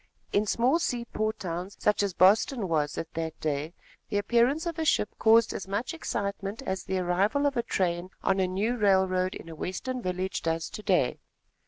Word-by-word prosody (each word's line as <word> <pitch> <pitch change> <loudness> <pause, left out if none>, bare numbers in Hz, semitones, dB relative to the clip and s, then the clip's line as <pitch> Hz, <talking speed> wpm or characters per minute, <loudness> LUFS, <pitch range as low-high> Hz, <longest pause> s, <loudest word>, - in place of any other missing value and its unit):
In 210 +1 +2
small 250 +10 +2
seaport 235 -6 -2
towns, 180 +2 -5
such 210 0 +2
as 200 -3 -1
Boston 205 +4 +4
was 150 -3 0
at 165 - -5
that 160 -1 -4
day, 155 +2 -2 0.3
the 205 - 0
appearance 240 - +2
of 335 -1 -3
a - - +1
ship 210 -8 +2
caused 230 +1 +5
as 190 - -5
much 205 - -2
excitement 200 -5 -3
as 190 -6 -3
the 190 - -1
arrival 190 +10 +1
of 280 -1 +1
a 240 - +2
train 180 -4 -1
on 195 0 +2
a 185 - +2
new 210 +7 -1
railroad 190 -3 +2
in - - -9
a 165 - -8
western 245 - -4
village 185 -1 -2
does 165 0 -2
to - - -7
day. 180 -12 +1
195 Hz, 190 wpm, -28 LUFS, 180-230 Hz, 0.3 s, caused